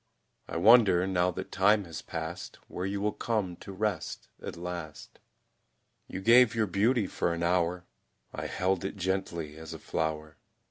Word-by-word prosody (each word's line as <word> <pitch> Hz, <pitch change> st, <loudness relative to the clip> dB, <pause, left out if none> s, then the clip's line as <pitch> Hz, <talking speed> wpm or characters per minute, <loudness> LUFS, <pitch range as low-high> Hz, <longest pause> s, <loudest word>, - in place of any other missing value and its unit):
I -, -, -4 dB
wonder, 100 Hz, -2 st, +6 dB
now 90 Hz, -1 st, +2 dB
that 90 Hz, -, -6 dB
time 105 Hz, +3 st, +4 dB
has 80 Hz, -3 st, -7 dB
passed, 85 Hz, +2 st, -6 dB
Where 90 Hz, +2 st, -4 dB
you 100 Hz, +1 st, -2 dB
will 105 Hz, +1 st, +1 dB
come 105 Hz, -7 st, -2 dB
to -, -, -10 dB
rest 100 Hz, 0 st, -3 dB
at -, -, -6 dB
last. 85 Hz, -3 st, -7 dB, 0.9 s
You 95 Hz, -, -6 dB
gave 120 Hz, +2 st, +6 dB
your 110 Hz, -1 st, +2 dB
beauty 105 Hz, +4 st, +2 dB
for 85 Hz, -2 st, -1 dB
an 85 Hz, -, -3 dB
hour, 90 Hz, 0 st, +1 dB, 0.5 s
I -, -, -4 dB
held 95 Hz, 0 st, 0 dB
it 95 Hz, -, -4 dB
gently 90 Hz, -5 st, -3 dB
as 80 Hz, 0 st, -8 dB
a -, -, -9 dB
flower. 80 Hz, -1 st, -3 dB
90 Hz, 165 wpm, -29 LUFS, 85-100 Hz, 0.9 s, wonder